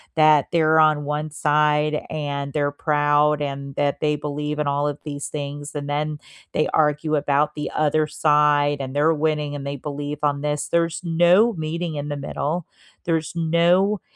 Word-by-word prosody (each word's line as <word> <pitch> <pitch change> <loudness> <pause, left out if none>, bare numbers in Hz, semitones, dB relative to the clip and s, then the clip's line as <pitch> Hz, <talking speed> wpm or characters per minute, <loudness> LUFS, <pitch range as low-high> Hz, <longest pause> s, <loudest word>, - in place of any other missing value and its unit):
that 155 -3 +5
they're 160 -2 +3
on 155 -2 +3
1 150 +1 -3
side 150 0 +1
and 140 -2 -4
they're 145 -1 0
proud 145 0 +2
and 140 -1 -5
that 145 -1 0
they 150 -1 +1
believe 150 0 -4
in 150 - 0
all 145 +1 0
of 145 0 -6
these 145 -2 -5
things 145 0 -6
and 145 -1 -4
then 150 +1 -2 0.3
they 155 - +1
argue 150 0 +1
about 145 +1 +1
the 150 -1 -4
other 155 0 +1
side 150 -1 +2
and 130 -1 -5
they're 155 +3 +3
winning 150 -1 -1
and 140 -1 -6
they 140 0 -3
believe 145 +1 -5
on 145 -1 0
this. 150 0 -2
There's 170 0 0
no 175 +7 +4
meeting 165 -1 -4
in 145 0 -4
the 145 - -3
middle, 150 +4 -3 0.4
there's 160 -2 -1
no 175 +5 +2
150 Hz, 175 wpm, -22 LUFS, 145-155 Hz, 0.4 s, that